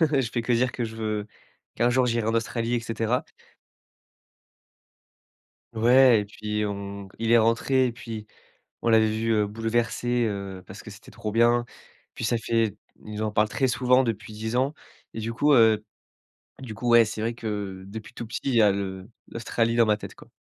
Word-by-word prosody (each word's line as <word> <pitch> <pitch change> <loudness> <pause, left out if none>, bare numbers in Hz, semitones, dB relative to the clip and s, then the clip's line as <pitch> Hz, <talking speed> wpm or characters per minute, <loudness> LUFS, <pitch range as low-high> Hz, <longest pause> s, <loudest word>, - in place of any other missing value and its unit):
Je 140 -7 +2
fais 120 - -1
que 120 - 0
dire 125 +2 +2
que 120 - -3
je 110 0 -7
veux 110 -2 -2 0.5
qu'un 120 +1 +3
jour 125 0 +3
j'irai 115 -2 0
en 115 - 0
Australie 115 +1 -1
et 120 - +1
cetera. 115 +1 -1 2.5
Ouais 120 0 +6
et - - -7
puis 105 +1 -3
on 100 -1 -5
il 115 0 -1
est 120 - +7
rentré 115 +4 +3
et 120 - -4
puis 115 -3 -8 0.6
on 115 - +2
l'avait 110 -1 +5
vu, 110 +1 0
heu, 105 -1 +2
bouleversé, 115 +2 -1
heu, 100 -2 -5
parce 100 - -10
que 110 - -10
c'était 110 +5 -13
trop 110 -1 -5
bien. 120 +1 +3 0.5
Puis - - -5
ça 120 - +1
fait 115 -2 0 0.3
ils 105 0 -5
en 110 -1 -1
parlent 105 0 +2
très 135 +4 0
souvent 125 +1 +3
depuis 110 -3 -4
10 110 +3 -3
ans 135 +4 +1 0.4
et 110 - -4
du 115 +1 -3
coup, 145 +5 +3
heu, 110 -3 +5 0.8
du 125 -5 -7
coup, 120 +3 -3
ouais 120 -1 +7
c'est 110 0 -5
vrai 115 +1 -2
que 100 -4 -5
depuis 105 +2 -9
tout 115 - -6
petit, 110 -1 -5
il 135 - +1
y 115 - +6
a 105 - +5
le 95 -1 -4 0.2
l'Australie 115 0 -1
dans 115 -1 +5
ma 105 -1 +3
tête 105 - -10
quoi. - - -16
115 Hz, 195 wpm, -25 LUFS, 105-120 Hz, 2.5 s, est